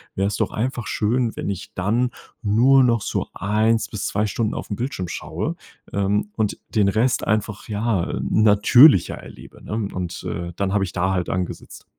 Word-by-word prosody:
wäre's 100 +1 0
doch - - 0
einfach 120 +1 -3
schön, 115 +2 0
wenn - - -4
ich 100 +2 -6
dann 115 +7 0 0.3
nur 125 +6 +5
noch 115 -3 +2
so - - -2
1 110 +3 +1
bis 105 - -4
2 105 +1 0
Stunden 105 +2 -1
auf - - -6
'n 105 - -2
Bildschirm 120 -6 -4
schaue, - - -4 0.4
ähm, 100 +1 0
und 110 -2 -1 0.2
den 105 -2 +4
Rest 115 +4 +1
einfach 105 -1 -1
ja, 105 -3 0
äh, - - -3
natürlicher 110 - +6
erlebe, - - -13
ne? - - -9 0.2
Und, 90 -2 -5
äh, 85 0 -5
dann 100 0 -1
hab 105 - +2
ich 95 - -2
da 95 +2 0
halt 90 -2 -1
angesetzt. 90 -1 -5
105 Hz, 180 wpm, -22 LUFS, 95-115 Hz, 0.4 s, natürlicher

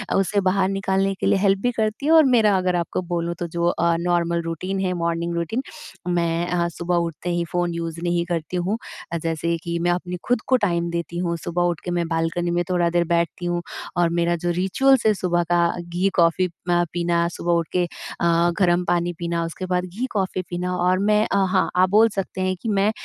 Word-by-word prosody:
उससे 195 +1 +2
बाहर 190 0 +2
निकालने 195 0 0
के - - -2
लिए 195 - +3
हेल्प 195 0 +3
भी 245 - +1
करती 220 +4 -1
है 310 - +3
और 325 -1 +8
मेरा 225 -6 +4
अगर 185 -1 0
आपको 175 +1 -1
बोलूँ 170 0 -1
तो 175 - -2
जो 170 +1 -1
अ, 170 -1 +2
नार्मल 170 -1 +1
रूटीन 185 +4 -3
है 185 -1 0
मॉर्निंग 170 0 -2
रूटीन। 170 +9 -1 0.5
मैं 170 -1 0
अ, 175 -1 0
सुबह 170 +1 -2
उठते 170 0 -2
ही 175 - 0
फ़ोन 175 -1 0
यूज़ 165 -1 -4
नहीं 175 0 0
करती 170 +1 -2
हूँ। 185 +5 -1 0.4
अ, - - +1
जैसे 165 +1 -1
कि 170 0 -2
मैं 175 +1 +1
अपनी 180 0 -3
खुद 245 -2 +2
को 260 - +4
टाइम 170 -1 -1
देती 170 0 -4
हूँ, 170 -1 -1
सुबह 175 +2 -2
उठ 175 -2 0
के 175 - -2
मैं 175 -1 0
बालकनी 165 +1 -1
में 175 0 +1
थोड़ा 175 -2 +2
देर 175 0 +2
बैठती 170 +1 0
हूँ 175 0 -1 0.4
और 175 -1 +3
मेरा 170 0 +2
जो 175 - +2
रिचुअल्स 265 +7 +3
है 215 - +5
सुबह 175 -3 0
का 170 -1 +4
घी 175 +3 -1
कॉफ़ी 170 +1 +3
अ, 175 0 -1
पीना, 170 0 +1
सुबह 175 0 -1
उठके 170 +2 0
अ, 170 0 0
गर्म 180 -1 +3
पानी 175 0 0
पीना, 170 -1 -1
उसके 165 +3 -5
बाद 180 0 0
घी 195 +8 -4
कॉफ़ी 190 -3 -1
पीना 180 +1 -2
और 180 +1 +2
मैं 210 +2 +3
अ - - +2
हाँ। 185 0 +2
आप 185 +1 +4
बोल 220 +3 +5
सकते 190 -1 -3
हैं 185 0 0
कि 225 - -3
मैं 200 0 +2
175 Hz, 220 wpm, -22 LUFS, 170-185 Hz, 0.5 s, और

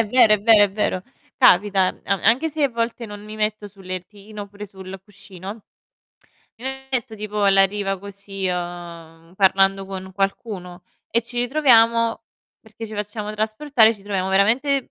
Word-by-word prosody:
È 230 - +2
vero, 225 -1 +5
è 210 - -2
vero, 215 0 +6
è 200 - -2
vero. 195 -2 -1 0.3
Capita, 190 0 +4 0.2
a 195 -1 0
anche 245 +9 +3
se 310 0 -3
a - - +3
volte 235 0 -3
non 205 -1 -9
mi 215 +1 -9
metto 215 -1 -2
sul 195 -1 -17
lettino 200 +3 -8
oppure 205 +1 -10
sul 190 0 -10
cuscino, 200 +1 -11 0.9
mi 240 - -12 0.3
metto 240 -3 -2
tipo 210 0 -3
alla 195 -1 +5
riva 195 0 -2
così, 200 0 -6
uhm, 170 -2 -6
parlando 195 0 +3
con 190 -1 -7
qualcuno 195 -2 -4 0.3
e 235 +2 +1
ci 240 +1 -7
ritroviamo 230 -4 +3 0.4
perché 220 +1 -10
ci 215 - -9
facciamo 210 0 -5
trasportare, 220 +2 +2
ci 200 - -18
troviamo 195 -2 -2
veramente 240 +8 +2
205 Hz, 160 wpm, -22 LUFS, 195-225 Hz, 0.9 s, vero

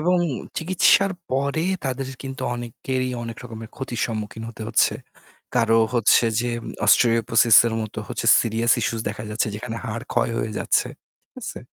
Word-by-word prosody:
এবং 180 +3 +2 0.4
চিকিৎসার 185 +3 +3 0.2
পরে 140 +5 0 0.2
তাদের 130 0 -3
কিন্তু 135 -1 -6
অনেকেই 130 +2 -3
অনেক 115 -1 -6
রকমের 110 -2 -8
ক্ষতির 130 -2 -4
সম্মুখীন 110 0 -5
হতে 115 -1 -9
হচ্ছে। 115 - +3 0.6
কারো 115 -1 +4 0.2
হচ্ছে 120 0 +4 0.2
যে 120 0 -1 0.4
"অস্টিওপোসিসের" 115 0 +5
মতো 110 - -6
হচ্ছে - - -4
সিরিয়াস 115 +1 +1
ইস্যু 115 - -1
দেখা 105 +1 -6
যাচ্ছে 110 +2 0
যেখানে 110 +2 -6
হাড় 115 +1 -4
ক্ষয় 120 -1 +2
হয়ে 110 - -2
যাচ্ছে। - - +1 0.4
ঠিক - - -67
আছে? - - -6
115 Hz, 150 wpm, -23 LUFS, 115-130 Hz, 0.6 s, অস্টিওপোসিসের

